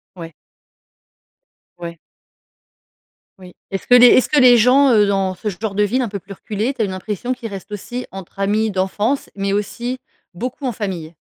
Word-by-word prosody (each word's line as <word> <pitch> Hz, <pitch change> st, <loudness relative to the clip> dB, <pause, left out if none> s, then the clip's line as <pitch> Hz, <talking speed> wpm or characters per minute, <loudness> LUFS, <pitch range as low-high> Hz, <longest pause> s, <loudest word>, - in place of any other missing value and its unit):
Ouais. 165 Hz, -2 st, -9 dB, 1.5 s
Ouais. 170 Hz, -1 st, -8 dB, 1.4 s
Oui, 180 Hz, -1 st, -13 dB, 0.2 s
est-ce 195 Hz, -, -5 dB
que 245 Hz, -, +7 dB
les 245 Hz, 0 st, +9 dB
est-ce 255 Hz, -, +5 dB
que 295 Hz, -, +3 dB
les 250 Hz, -2 st, +7 dB
gens, 260 Hz, +4 st, +5 dB
heu, 210 Hz, -3 st, +4 dB
dans 195 Hz, -1 st, 0 dB
ce 200 Hz, +4 st, -7 dB
genre 205 Hz, +1 st, -3 dB
de 210 Hz, +1 st, +2 dB
ville 235 Hz, +6 st, 0 dB
un 240 Hz, -, -2 dB
peu 200 Hz, 0 st, -5 dB
plus 195 Hz, +2 st, -11 dB
reculée, 215 Hz, +6 st, -3 dB
tu 255 Hz, -, -4 dB
as -, -, +2 dB
une 195 Hz, -, -5 dB
impression 210 Hz, +6 st, -4 dB
qu'ils 245 Hz, -2 st, -7 dB
restent 195 Hz, 0 st, -9 dB
aussi 240 Hz, +5 st, -6 dB
entre 195 Hz, 0 st, -11 dB
amis 210 Hz, +3 st, +1 dB
d'enfance, 205 Hz, +7 st, -1 dB
mais 195 Hz, 0 st, -1 dB
aussi, 235 Hz, +5 st, -3 dB, 0.4 s
beaucoup 250 Hz, +9 st, -5 dB
en 250 Hz, -, -1 dB
famille? 185 Hz, -7 st, -5 dB
210 Hz, 185 wpm, -19 LUFS, 195-245 Hz, 1.5 s, les